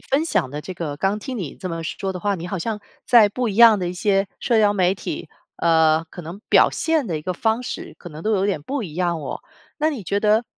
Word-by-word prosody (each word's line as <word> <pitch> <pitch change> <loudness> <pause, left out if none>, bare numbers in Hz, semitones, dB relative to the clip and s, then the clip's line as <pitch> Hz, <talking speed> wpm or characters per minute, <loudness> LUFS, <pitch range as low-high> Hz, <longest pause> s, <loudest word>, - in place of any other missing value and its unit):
分 280 +4 0
享 135 - 0
的 145 +2 -5
这 185 +4 -7
个 155 -4 -4
刚 195 +6 0
听 255 +2 -5
你 165 -9 -5
这 185 - -6
么 165 -1 -4
说 195 +4 -3
的 180 - -5
话， 200 +3 0
你 175 -1 -6
好 195 - -3
像 210 +4 -3 0.3
在 230 -4 +7
不 240 +3 -2
一 205 - -3
样 230 -1 +7
的 180 -2 -2
一 - - -3
些 195 +1 +1
社 235 -3 +2
交 210 -1 +4
媒 185 -2 +2
体， 185 -3 -6 0.3
呃， 160 -1 +3
可 - - -9
能 170 +4 -9
表 - - +6
现 320 -5 0
的 170 -6 -2
一 150 - -6
个 185 - -2
方 220 +6 0
式 250 - -6
可 175 - -10
能 155 0 -10
都 220 - +1
有 195 -2 +2
点 195 -7 -1
不 265 - -3
一 165 -7 -7
样 175 -2 0
哦。 140 - -5 0.4
那 310 +1 +2
你 270 -8 -5
觉 200 +3 -1
得 215 +3 +3
195 Hz, 285 characters per minute, -22 LUFS, 170-220 Hz, 0.4 s, 在